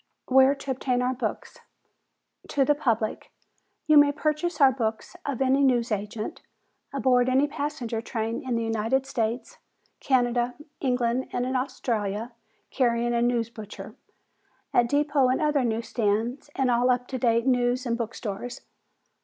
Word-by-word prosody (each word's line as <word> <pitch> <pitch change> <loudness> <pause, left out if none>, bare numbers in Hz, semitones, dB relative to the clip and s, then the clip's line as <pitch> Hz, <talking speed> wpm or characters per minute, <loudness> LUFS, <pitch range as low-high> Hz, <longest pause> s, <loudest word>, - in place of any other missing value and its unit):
Where 265 +1 +5
to 275 -1 -5
Obtain 250 -1 0
Our 255 +1 +1
Books 255 - -5 0.9
To 275 -2 +1
The 295 - +4
Public: 230 -7 -1 0.5
You 305 -1 +7
may 290 0 +5
purchase 305 +4 -1
our 275 -2 +7
books 225 -4 -3
of 270 -2 0
any 265 +1 +3
news 245 -3 +2
agent, 210 +1 -4 0.5
aboard 255 -2 +2
every 265 +3 +4
passenger 285 -6 -3
train 225 -1 -3
in 255 -2 -2
the 230 - 0
United 225 +4 0
States, 235 -2 -3 0.4
Canada, 245 -2 +1 0.2
England 250 -1 0
and 245 - -1
Australia, 230 -4 -2 0.4
carrying 240 -2 +1
a 235 - +1
"news 235 -1 +1
butcher." 215 -3 -9 0.8
At 240 -1 +3
depot 285 -1 +2
and 255 - +1
other 295 -3 +2
news 230 -1 -2
stands 230 +5 -1
and 260 -2 +1
all 245 +1 +3
up 250 0 +2
to 260 - -3
date 230 -1 +2
news 250 0 +1
and 235 -1 0
book 235 0 -4
stores. 235 +4 -5
245 Hz, 150 wpm, -26 LUFS, 230-270 Hz, 0.9 s, You